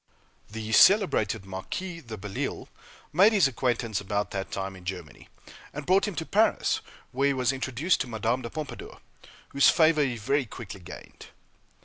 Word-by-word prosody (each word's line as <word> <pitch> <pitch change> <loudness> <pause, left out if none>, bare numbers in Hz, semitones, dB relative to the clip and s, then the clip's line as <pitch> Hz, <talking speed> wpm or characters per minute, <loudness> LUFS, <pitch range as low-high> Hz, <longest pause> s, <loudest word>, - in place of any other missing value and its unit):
The 110 +1 -6
celebrated 180 - +4
Marquis 165 - -6
de 115 -5 -8
Belleisle 95 0 -5 0.5
made 195 +7 +6
his 195 -9 +5
acquaintance 120 -5 -1
about 100 +1 -2
that 95 -1 -4
time 95 0 -4
in 90 - -13
Germany, 90 -3 -8 0.4
and 145 0 -6
brought 190 +3 +3
him 205 - -4
to 160 - -3
Paris, 215 +6 +2 0.3
where 135 +2 +1
he 140 - +2
was 130 0 +1
introduced 135 +6 0
to - - -3
Madame 120 +2 -1
de 115 - -6
Pompadour, 155 0 -7 0.5
whose 140 - +5
favor 155 -2 +4
he 125 -4 -2
very 135 +5 0
quickly 105 -1 -9
gained. 90 0 -12
125 Hz, 160 wpm, -27 LUFS, 105-155 Hz, 0.5 s, made